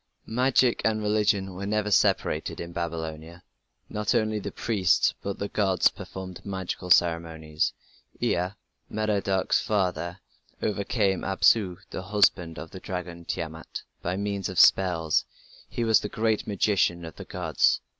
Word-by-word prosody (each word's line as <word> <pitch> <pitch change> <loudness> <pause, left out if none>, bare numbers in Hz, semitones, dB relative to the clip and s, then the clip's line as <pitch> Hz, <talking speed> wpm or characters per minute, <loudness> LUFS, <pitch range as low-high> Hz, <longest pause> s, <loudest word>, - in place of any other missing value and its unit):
Magic 125 +1 +2
and 110 -1 +2
religion 105 -2 +1
were 100 +2 -5
never 105 0 0
separated - - +1
in 85 0 -6
Babylonia; 80 0 -5 0.4
not 105 -1 -1
only 110 -1 +1
the - - -5
priests 100 -6 +2
but - - -4
also - - -17
the 100 - -1
gods 95 -4 +3
performed 95 -2 -8
magical 95 -2 -4
ceremonies. 80 -2 +2 0.5
Ea, 90 +1 +1 0.4
Merodach's 100 -3 +1
father, 90 -3 -1 0.4
overcame 100 -2 0
Apsu, 95 -1 +3
the - - -4
husband 95 -4 +2
of 80 - -8
the 95 - -8
dragon 90 -2 -6
Tiamat, 80 -1 -5 0.2
by 90 +1 -2
means 100 -1 -2
of 95 - -1
spells: 85 -5 +4 0.5
he 120 - -2
was 110 -1 +5
"the 105 - -5
great 110 0 0
magician 100 -4 +1
of 80 - -10
the - - -7
gods". - - +1
95 Hz, 140 wpm, -27 LUFS, 85-105 Hz, 0.5 s, was